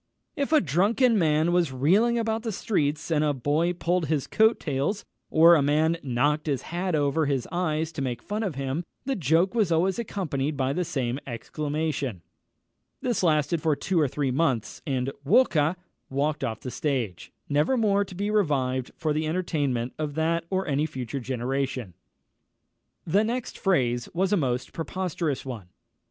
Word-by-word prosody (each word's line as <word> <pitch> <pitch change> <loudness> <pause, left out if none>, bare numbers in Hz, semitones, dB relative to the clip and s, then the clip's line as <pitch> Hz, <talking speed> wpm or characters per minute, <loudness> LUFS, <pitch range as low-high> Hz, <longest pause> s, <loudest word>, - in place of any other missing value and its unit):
_" - - -53 0.3
If 280 +1 -2
a 310 - +6
drunken 205 - +3
man 155 0 +2
was 175 -5 +2
reeling 195 - +3
about 225 -1 0
the 225 -1 -3
streets, 155 -6 -1
and 155 -1 +3
a 145 -2 +1
boy 150 +7 +1
pulled 175 -1 0
his 150 -2 0
coat 220 +1 +3
tails, 150 +8 -2 0.2
or 165 +2 +7
a 160 - +5
man 155 +4 +2
knocked 145 +4 0
his 140 -4 -1
hat 175 0 -2
over 145 +1 +1
his 135 -3 -1
eyes 160 -2 -1
to 155 -3 -5
make 125 -3 -3
fun 210 +2 -3
of 195 -9 -2
him, 135 +4 -2 0.2
the 270 0 0
joke 165 - +2
was 215 -7 +1
always 180 +5 +2
accompanied 155 -10 -2
by 135 0 0
the 180 - 0
same 135 -6 -2
exclamation. 145 - -3 0.8
This 240 -5 0
lasted 155 -1 +2
for 155 -2 +2
two 180 +4 0
or 150 - +3
three 140 0 -1
months, 130 -5 0
and 130 -1 -1
"Walker!" 160 - +3 0.3
walked 145 +2 -1
off 115 -4 -3
the 125 - -5
stage, 120 - -2 0.2
never 150 - +2
more 205 -3 +3
to 190 -2 -10
be 205 +3 -1
revived 135 - +1
for 155 -3 0
the 155 +1 -1
entertainment 145 -8 -1
of 150 -2 -3
that 165 +1 0
or 190 0 0
any 145 +1 +1
future 130 -2 -5
generation. 130 -3 -3 1.1
The 195 +6 +3
next 235 +2 -3
phrase 125 - +1
was 190 +3 +1
a - - +4
most 125 -5 -1
preposterous 165 -4 -3
one. 115 -8 -6
155 Hz, 170 wpm, -26 LUFS, 135-180 Hz, 1.1 s, or